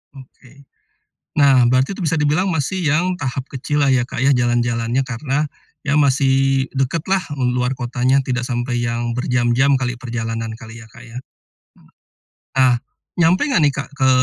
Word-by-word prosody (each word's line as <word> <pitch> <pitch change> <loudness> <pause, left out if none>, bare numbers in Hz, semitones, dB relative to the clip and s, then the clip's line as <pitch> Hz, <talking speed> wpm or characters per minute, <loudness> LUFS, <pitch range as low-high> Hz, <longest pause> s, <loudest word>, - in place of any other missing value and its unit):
Oke. 135 +1 -16 0.8
Nah, 135 -4 +5
berarti 130 +9 +1
itu 190 - -7
bisa 160 -1 0
dibilang 150 +6 +1
masih 170 +3 -2
yang 175 +5 +1
tahap 130 -1 -4
kecil 145 +2 -2
lah 140 - +3
ya 130 -2 +3
Kak - - -7
ya, 140 - +4
jalan-jalannya 120 0 0
karena 135 +4 -2 0.4
ya, 140 - +1
masih 135 -1 +2
dekatlah, 165 +8 0
di 125 -3 0
luar 125 +1 0
kotanya 125 +2 +1
tidak 125 -1 -1
sampai 120 0 -2
yang 120 0 -2
berjam-jam 125 +2 +2
kali 125 -1 -2
perjalanan 115 -2 -4
kali 115 +1 -11
ya, - - -13
Kak 120 - -15
ya? 115 - -12 1.4
Nah, 130 -2 +5 0.4
nyampe 175 - +3
enggak 250 - +2
nih 145 -1 +3
Kak, 145 - -5
ke 130 -1 +1
130 Hz, 160 wpm, -19 LUFS, 120-145 Hz, 1.4 s, Nah